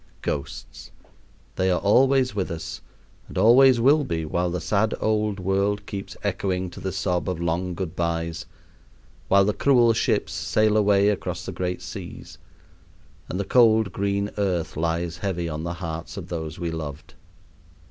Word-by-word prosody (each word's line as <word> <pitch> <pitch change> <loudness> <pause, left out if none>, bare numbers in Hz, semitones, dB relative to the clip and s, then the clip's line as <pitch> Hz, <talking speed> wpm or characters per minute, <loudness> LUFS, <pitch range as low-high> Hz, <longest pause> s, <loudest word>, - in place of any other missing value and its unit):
Ghosts! 70 +1 -5 0.7
they 95 0 +2
are 90 - +2
always 130 +5 +3
with 100 -3 -2
us 80 -1 -6 0.5
and - - -9
always 120 +5 +6
will 145 +5 +4
be 80 - -2
while 85 +3 -1
the 90 +1 -2
sad 105 +6 +1
old 105 -2 0
world 100 +2 0
keeps 100 -1 -7
echoing 95 -2 -1
to - - -10
the 95 - -3
sob 90 -1 -1
of 90 -3 -3
long 85 +2 -1
good 90 -2 -5
bys, 85 -2 -2 0.8
while 100 0 +5
the 105 - +1
cruel 120 +1 +4
ships - - 0
sail 110 -1 +1
away 100 -1 +4
across 90 -3 -3
the - - -4
great 90 0 -3
seas, - - -9 0.9
and 90 - -3
the 100 - -1
cold 110 -4 +4
green 100 +2 -1
earth 90 -5 -1
lies 85 +2 -1
heavy 90 -3 -2
on 75 -1 -4
the 85 0 -3
hearts 85 +1 -6
of 95 -3 -7
those 80 -2 -5
we 85 -1 -3
loved. 75 -3 -7
95 Hz, 160 wpm, -24 LUFS, 85-105 Hz, 0.9 s, always